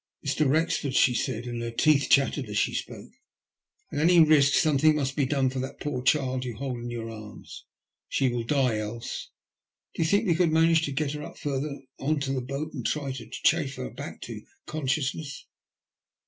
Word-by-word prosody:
Mr. 145 Hz, 0 st, +1 dB
Wrexford/' 150 Hz, -2 st, +1 dB
she 125 Hz, -, +5 dB
said, 120 Hz, -1 st, -2 dB
and 120 Hz, -1 st, -4 dB
her 115 Hz, -, -3 dB
teeth 140 Hz, +4 st, +3 dB
chattered 140 Hz, -1 st, +3 dB
as -, -, -3 dB
she -, -, +1 dB
spoke, -, -, -6 dB, 0.8 s
at -, -, -2 dB
any 170 Hz, +3 st, +5 dB
risk 150 Hz, -3 st, +6 dB
something 155 Hz, -1 st, +4 dB
must 135 Hz, -2 st, -1 dB
be 140 Hz, -3 st, +1 dB
done 135 Hz, -1 st, +1 dB
for 130 Hz, 0 st, -2 dB
that 130 Hz, -, -5 dB
poor 145 Hz, -4 st, -3 dB
child 130 Hz, -1 st, +1 dB
you 120 Hz, -3 st, -5 dB
hold 130 Hz, 0 st, -4 dB
in 120 Hz, 0 st, -6 dB
your 115 Hz, -1 st, -5 dB
arms, 110 Hz, -1 st, -10 dB, 0.4 s
she 135 Hz, -, +1 dB
will 120 Hz, -1 st, -1 dB
die 125 Hz, -3 st, +1 dB
else. 110 Hz, +2 st, -5 dB, 0.6 s
Do -, -, -3 dB
you 160 Hz, -, +2 dB
think 205 Hz, +4 st, +3 dB
we 175 Hz, -, +3 dB
could 170 Hz, -1 st, +2 dB
manage 165 Hz, 0 st, +4 dB
to 140 Hz, -, -4 dB
get 140 Hz, +1 st, -1 dB
her 150 Hz, 0 st, -5 dB
up -, -, -9 dB
further 140 Hz, 0 st, -3 dB, 0.2 s
on 150 Hz, +2 st, 0 dB
to 135 Hz, -1 st, -1 dB
the 130 Hz, -, -1 dB
boat 140 Hz, +5 st, -5 dB
and 130 Hz, -5 st, -5 dB
then -, -, +1 dB
try 145 Hz, -3 st, -3 dB
to 120 Hz, -4 st, -8 dB
chafe 140 Hz, +2 st, +1 dB
her -, -, -5 dB
back -, -, -8 dB
to -, -, -7 dB, 0.2 s
conciousness 140 Hz, 0 st, -2 dB
140 Hz, 205 wpm, -27 LUFS, 125-155 Hz, 0.8 s, risk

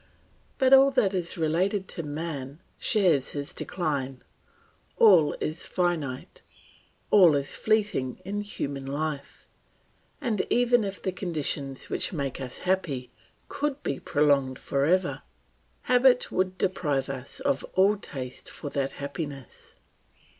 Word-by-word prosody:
But 265 Hz, -1 st, +4 dB
all 270 Hz, +1 st, +8 dB
that 250 Hz, -8 st, +2 dB
is 180 Hz, -2 st, -2 dB
related 185 Hz, +5 st, 0 dB
to -, -, -3 dB
man 145 Hz, -2 st, -5 dB, 0.2 s
shares 180 Hz, -, +2 dB
his 145 Hz, +3 st, -5 dB
decline; 140 Hz, -7 st, -3 dB, 0.7 s
all 180 Hz, -9 st, +6 dB
is 155 Hz, +2 st, -3 dB
finite, 165 Hz, -8 st, -2 dB, 0.7 s
all 180 Hz, -7 st, +7 dB
is 140 Hz, -1 st, -1 dB
fleeting 210 Hz, -, 0 dB
in 205 Hz, +2 st, -2 dB
human 140 Hz, -9 st, -5 dB
life, 145 Hz, 0 st, -4 dB, 0.7 s
and 235 Hz, -9 st, 0 dB
even 245 Hz, -1 st, +3 dB
if 195 Hz, -1 st, -4 dB
the 190 Hz, -, 0 dB
conditions 150 Hz, -7 st, -3 dB
which -, -, -2 dB
make 140 Hz, -5 st, -3 dB
us 130 Hz, -1 st, -5 dB
happy 160 Hz, -9 st, -1 dB, 0.4 s
could 290 Hz, 0 st, -3 dB
be 135 Hz, -, -2 dB
prolonged 140 Hz, -3 st, +2 dB
for 140 Hz, +1 st, -1 dB
ever, 180 Hz, +3 st, +1 dB, 0.6 s
habit 250 Hz, 0 st, +4 dB
would 185 Hz, 0 st, 0 dB
deprive 155 Hz, -9 st, 0 dB
us 135 Hz, -1 st, -7 dB
of 280 Hz, -1 st, 0 dB
all 195 Hz, +3 st, +5 dB
taste 130 Hz, -10 st, -7 dB
for 145 Hz, -, -7 dB
that 140 Hz, -1 st, -1 dB
happiness. 140 Hz, -2 st, -7 dB
165 Hz, 125 wpm, -27 LUFS, 140-200 Hz, 0.7 s, all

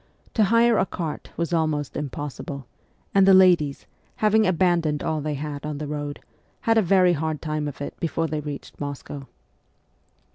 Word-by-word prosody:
To 220 Hz, -, +4 dB
hire 230 Hz, +2 st, +4 dB
a -, -, +3 dB
cart 165 Hz, -3 st, -5 dB
was 170 Hz, +1 st, -1 dB
almost 155 Hz, -4 st, 0 dB
impossible, 140 Hz, -1 st, -5 dB, 0.5 s
and 195 Hz, -1 st, +5 dB
the 195 Hz, -, +8 dB
ladies, 175 Hz, -7 st, +4 dB, 0.3 s
having 215 Hz, 0 st, +3 dB
abandoned 170 Hz, -4 st, +2 dB
all 155 Hz, -1 st, -1 dB
they 150 Hz, 0 st, -2 dB
had 145 Hz, 0 st, -5 dB
on 150 Hz, -1 st, -4 dB
the 150 Hz, -, -4 dB
road, 145 Hz, -1 st, -4 dB, 0.4 s
had 225 Hz, 0 st, +3 dB
a -, -, +4 dB
very 185 Hz, -1 st, +4 dB
hard 155 Hz, -1 st, -2 dB
time 155 Hz, -1 st, -2 dB
of 145 Hz, -1 st, -7 dB
it 145 Hz, -, -4 dB
before 165 Hz, -1 st, -1 dB
they 155 Hz, -1 st, -2 dB
reached 145 Hz, -1 st, -8 dB
Moscow. 145 Hz, -1 st, -6 dB
155 Hz, 170 wpm, -24 LUFS, 145-185 Hz, 0.5 s, the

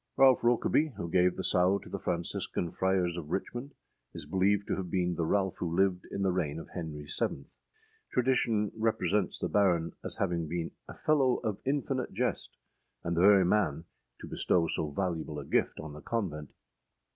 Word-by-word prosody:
Ralph 135 Hz, -2 st, +6 dB
Rokeby, 125 Hz, +4 st, +2 dB
who 85 Hz, -4 st, -5 dB
gave 90 Hz, 0 st, +3 dB
the 95 Hz, -, -4 dB
sow 90 Hz, +2 st, +3 dB
to -, -, -12 dB
the 100 Hz, +2 st, -5 dB
Franciscan 85 Hz, -1 st, -2 dB
Friars 90 Hz, -1 st, +1 dB
of 80 Hz, -3 st, -6 dB
Richmond, 120 Hz, -, -4 dB, 0.4 s
is -, -, -6 dB
believed 100 Hz, +2 st, +2 dB
to -, -, -2 dB
have 95 Hz, -2 st, -4 dB
been 90 Hz, -1 st, 0 dB
the 80 Hz, -1 st, -1 dB
Ralph 95 Hz, -1 st, +1 dB
who 85 Hz, -1 st, -2 dB
lived 95 Hz, -2 st, +2 dB
in 100 Hz, -, -3 dB
the 95 Hz, -, +3 dB
reign 80 Hz, -5 st, -1 dB
of 80 Hz, -, -8 dB
Henry 80 Hz, -4 st, -6 dB
VII. 70 Hz, -1 st, -3 dB, 0.7 s
Tradition 120 Hz, -5 st, +2 dB
represents 105 Hz, -4 st, 0 dB
the -, -, -2 dB
Baron 90 Hz, -5 st, +2 dB
as -, -, -5 dB
having 85 Hz, -4 st, -1 dB
been 85 Hz, +1 st, -3 dB, 0.2 s
âa -, -, -9 dB
fellow 135 Hz, -5 st, +3 dB
of 110 Hz, -4 st, -2 dB
infinite 135 Hz, -2 st, -1 dB
jest,â 125 Hz, +5 st, -1 dB, 0.6 s
and 85 Hz, -, 0 dB
the 85 Hz, -, +2 dB
very 100 Hz, -1 st, +7 dB
man 85 Hz, -5 st, +1 dB, 0.4 s
to -, -, -7 dB
bestow 85 Hz, -2 st, +1 dB
so 80 Hz, -1 st, -2 dB
valuable 80 Hz, -2 st, -2 dB
a 70 Hz, -, -6 dB
gift -, -, 0 dB
on 80 Hz, -1 st, -7 dB
the 75 Hz, -, -10 dB
convent! 80 Hz, -, -3 dB
95 Hz, 180 wpm, -30 LUFS, 85-105 Hz, 0.7 s, very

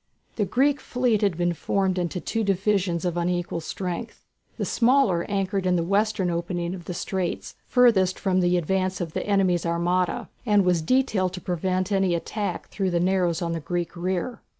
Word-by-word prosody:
The 210 Hz, -, 0 dB
Greek 270 Hz, +8 st, +2 dB
fleet 245 Hz, -4 st, 0 dB
had 200 Hz, -6 st, +1 dB
been 175 Hz, 0 st, +1 dB
formed 190 Hz, +2 st, 0 dB
in 175 Hz, -1 st, -1 dB
two 220 Hz, +6 st, -2 dB
divisions 195 Hz, -3 st, +1 dB
of 175 Hz, -1 st, -1 dB
unequal 175 Hz, -1 st, -1 dB
strength. 185 Hz, +6 st, -5 dB, 0.3 s
The -, -, -1 dB
smaller 235 Hz, -8 st, +3 dB
anchored 195 Hz, -1 st, -1 dB
in 180 Hz, -, +3 dB
the 170 Hz, -, +1 dB
western 200 Hz, 0 st, +1 dB
opening 170 Hz, +1 st, -2 dB
of 175 Hz, -3 st, -8 dB
the 180 Hz, -, -5 dB
straits, 185 Hz, -2 st, -3 dB
furthest 215 Hz, -7 st, +4 dB
from 185 Hz, -2 st, +1 dB
the 180 Hz, 0 st, +3 dB
advance 185 Hz, +2 st, 0 dB
of 165 Hz, -3 st, -4 dB
the -, -, -3 dB
enemy's 190 Hz, -4 st, +2 dB
armada, 175 Hz, +2 st, 0 dB, 0.2 s
and 205 Hz, -5 st, +3 dB
was 180 Hz, -2 st, +2 dB
detailed 190 Hz, -2 st, +1 dB
to 180 Hz, -, -6 dB
prevent 185 Hz, +2 st, -1 dB
any 190 Hz, -3 st, +2 dB
attack 205 Hz, +4 st, -4 dB
through 195 Hz, -2 st, -1 dB
the 175 Hz, -1 st, +1 dB
narrows 180 Hz, -1 st, +1 dB
on 170 Hz, -, -2 dB
the 165 Hz, -, -2 dB
Greek 175 Hz, +2 st, -3 dB
rear. 185 Hz, +6 st, -2 dB
185 Hz, 180 wpm, -25 LUFS, 175-200 Hz, 0.3 s, furthest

